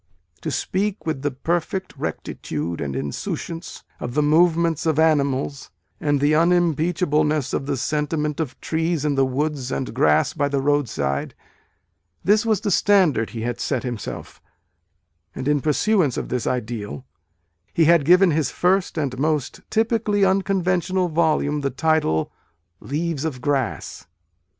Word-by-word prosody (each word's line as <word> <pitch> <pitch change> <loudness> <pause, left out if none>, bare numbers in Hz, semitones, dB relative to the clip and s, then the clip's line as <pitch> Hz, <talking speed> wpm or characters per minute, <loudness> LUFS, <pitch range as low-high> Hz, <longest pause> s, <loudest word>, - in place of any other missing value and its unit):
"To - - -3
speak 205 +2 -2
with 155 -4 -2
the 145 - 0
perfect 170 +7 -2
rectitude 80 +2 -4
and 70 -2 -3
insouciance 75 - -5 0.2
of 120 +1 -5
the 150 - +3
movements 165 +1 +3
of 155 -2 +1
animals, 140 -3 +1 0.3
and 145 -1 +1
the 145 +2 +3
unimpeachableness 160 -3 +2
of 135 - -2
the 140 -2 -1
sentiment 150 +3 -1
of 150 -5 -4
trees 160 -1 -1
in 150 - +2
the 135 -1 +2
woods 135 -1 -2
and 130 - -3
grass 75 -1 +3
by 145 -3 0
the 140 -1 0
roadside," 130 - -1 0.9
this 210 +3 +3
was 215 -3 +2
the 205 - -1
standard 175 - +3
he 115 - -6
had 120 +1 -3
set 130 -2 -1
himself: 120 -4 -6 0.9
and, 130 - -4
in 145 -1 +2
pursuance 155 - +2
of - - -4
this 125 -3 -2
ideal, 120 -1 -3 0.7
he 165 - +3
had 170 -1 +5
given 180 +4 +5
his 155 -1 +1
first 180 0 +1
and 135 -4 -2
most 150 -2 -1
typically 220 -2 +2
unconventional 185 -2 +1
volume 155 -2 +1
the 140 - 0
title 135 - +1 0.5
"Leaves 155 +1 -3
of 150 -6 -3
Grass. 135 -1 -2
150 Hz, 140 wpm, -22 LUFS, 135-170 Hz, 0.9 s, had